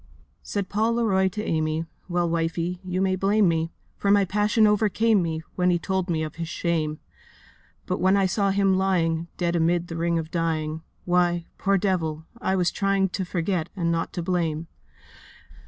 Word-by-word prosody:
Said 200 -2 -3
Paul 220 +3 +1
Leroy 200 -5 +2
to 210 +3 -4
Amy, 155 -2 -1 0.2
'Well, 175 0 +1
wifie, 165 +1 -1
you 185 0 -2
may 190 -1 +2
blame 200 +2 +3
me, 165 0 0 0.3
For 200 - -1
my 200 -1 +5
passion 210 +4 +2
overcame 210 0 +3
me, 160 -2 -2
When 180 0 +2
he 175 - +3
told 190 +1 -2
me 160 -2 0
of 155 - -6
his 165 -1 -3
shame; 160 -3 -1 0.9
But 185 - -2
when 190 +2 +4
I 195 - +3
saw 200 +2 +1
him 195 -1 +3
lying, 170 -3 +1
Dead 175 -1 0
amid 170 +1 +1
a - - -4
ring 170 0 0
of 160 -1 -4
dying, 160 -2 -1 0.2
Why, 175 -1 +2
poor 195 0 +2
devil, 165 -5 -1 0.2
I 190 -3 +1
was 180 -2 +2
trying 195 -1 +1
To 190 - -3
forget, 175 -1 -1
and 170 -3 0
not 165 0 -1
to 175 - -3
blame. 165 -3 -1
175 Hz, 180 wpm, -25 LUFS, 165-195 Hz, 0.9 s, my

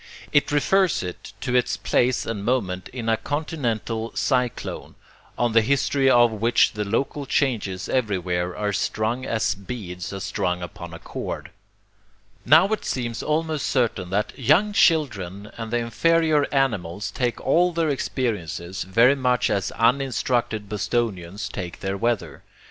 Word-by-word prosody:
It 145 0 +3
refers 180 - +2
it 90 -1 -7
to 125 -1 -1
its 125 0 +2
place 125 0 +1
and 105 -3 -4
moment 100 -7 -1
in 120 -3 -6
a 115 0 +3
continental 115 -5 -2
cyclone, 125 -3 -1 0.4
on 120 -1 +1
the 115 +1 +5
history 135 +2 +2
of 120 -2 +5
which 115 +2 +2
the 105 -1 -2
local 135 +7 -2
changes 105 -10 0
everywhere 90 -7 -1
are 105 -1 -1
strung 110 +6 -1
as 110 -2 +1
beads 95 -4 -7
are 100 - -5
strung 90 -2 -2
upon 85 -1 -8
a - - -7
cord. - - -6 1.0
Now 160 +5 +7
it 220 - -1
seems 120 -3 -3
almost 155 -1 -1
certain 115 -8 0
that 105 +3 -1
young 165 - +3
children 105 - +1
and 115 -1 -6
the 120 - 0
inferior 155 +6 +2
animals 105 -7 0
take 120 -2 -1
all 175 +6 +3
their 165 -2 0
experiences 100 - -3
very 115 +8 +4
much 125 -3 +1
as 100 -3 0
uninstructed 120 -3 +1
Bostonians 105 -3 -2
take 90 -3 -6
their 95 0 -2
weather. 115 +1 -1
115 Hz, 145 wpm, -24 LUFS, 100-135 Hz, 1.0 s, Now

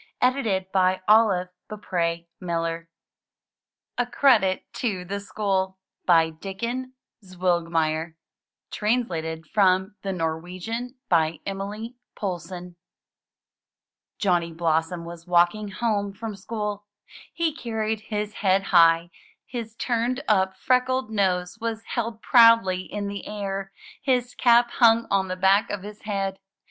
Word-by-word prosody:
97 240 -7 +1
MYBOOK 185 0 +3 0.2
HOUSE 170 -3 -3 1.1
A 245 - +3
CREDIT 230 -7 +3
TO 195 -7 -2
THE 200 +2 -3
SCHOOL* 195 -2 -1 0.3
Dikken 195 +10 0 0.3
Zwilgmeyer 165 -3 0 0.6
Translated 170 -8 -1
from 190 +2 +2
the 195 - -3
Norwegian 180 +9 -4
by 160 -2 +2
Emilie 205 +5 -5 0.2
Poulsson 180 -2 -5 1.4
Johnny 175 -4 +1
Blossom 165 +1 -1
was 170 0 -10
walking 175 +4 +3
home 205 0 -1
from 220 +1 -6
school. 210 0 -5 0.4
He 325 +1 0
carried 220 -5 -2
his 210 -1 -4
head 195 -1 +2
high; 165 0 +5 0.3
his 230 -3 -6
tumed 245 +2 -1
up, 190 -3 +2
freckled 255 0 +1
nose 185 -1 0
was 225 -1 -3
held 230 -1 -4
proudly 230 -6 +5
in 205 -1 -3
the 200 -1 -6
air; 195 -2 -4 0.3
his 250 -2 0
cap 240 -1 +4
hung 230 -1 +5
on 195 -1 +2
the 185 - -3
back 195 +3 +3
of 205 -2 -4
his 210 +1 -9
head. 195 -2 -2
195 Hz, 110 wpm, -25 LUFS, 180-225 Hz, 1.4 s, high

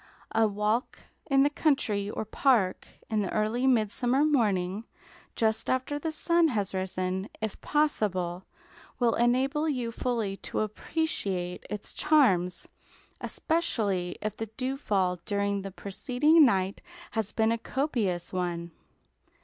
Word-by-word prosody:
A 225 0 +4
walk 210 +4 -1 0.3
in 270 -1 +5
the 285 - +4
country 220 -10 +1
or 215 - -4
park, 220 -4 +2 0.2
in 215 -1 0
the 195 - -2
early 220 +4 +1
midsummer 245 +3 +2
morning, 210 -8 +1 0.5
just 220 -1 0
after 260 +3 0
the 320 +2 -2
sun 335 +1 +3
has 205 -9 -1
risen, 185 +1 -2
if 220 -2 -4
possible, 190 - 0 0.5
will 240 -2 +2
enable 265 +6 +2
you 250 -5 -2
fully 230 -5 -2
to - - -3
appreciate 205 - -2
its 210 0 -5
charms; 195 - +3 0.5
especially 205 - -1
if 215 - -2
the 225 - -4
dewfall 205 -9 0
during 200 -1 0
the 195 - -5
preceding 260 - +3
night 190 -2 0 0.3
has 220 -3 -1
been 220 0 +2
a 230 - 0
copious 220 - -1
one. 175 -2 -2
220 Hz, 125 wpm, -28 LUFS, 195-265 Hz, 0.5 s, in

